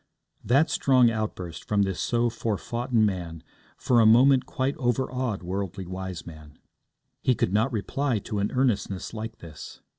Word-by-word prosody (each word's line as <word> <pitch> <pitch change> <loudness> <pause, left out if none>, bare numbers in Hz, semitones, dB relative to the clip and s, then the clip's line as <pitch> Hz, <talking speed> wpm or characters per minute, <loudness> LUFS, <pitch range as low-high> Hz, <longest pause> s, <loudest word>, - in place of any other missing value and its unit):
That 140 +7 +3
strong 130 -3 +4
outburst 105 -6 -4
from 105 -1 +1
this 95 -2 -2
so 120 0 +1
forfoughten 115 +1 -1
man 85 -5 -3 0.3
for 120 -2 +2
a 115 - +5
moment 130 +3 +5
quite 135 0 -1
overawed 125 -4 -1
Worldly 95 +1 -4
Wiseman. 85 -5 -8 0.6
He 130 - +2
could 95 - 0
not 110 +6 +2
reply 125 +3 -1
to 105 +1 -4
an 100 - -1
earnestness 110 -8 -1
like 110 0 -6
this. 80 -3 -11
110 Hz, 145 wpm, -26 LUFS, 95-125 Hz, 0.6 s, a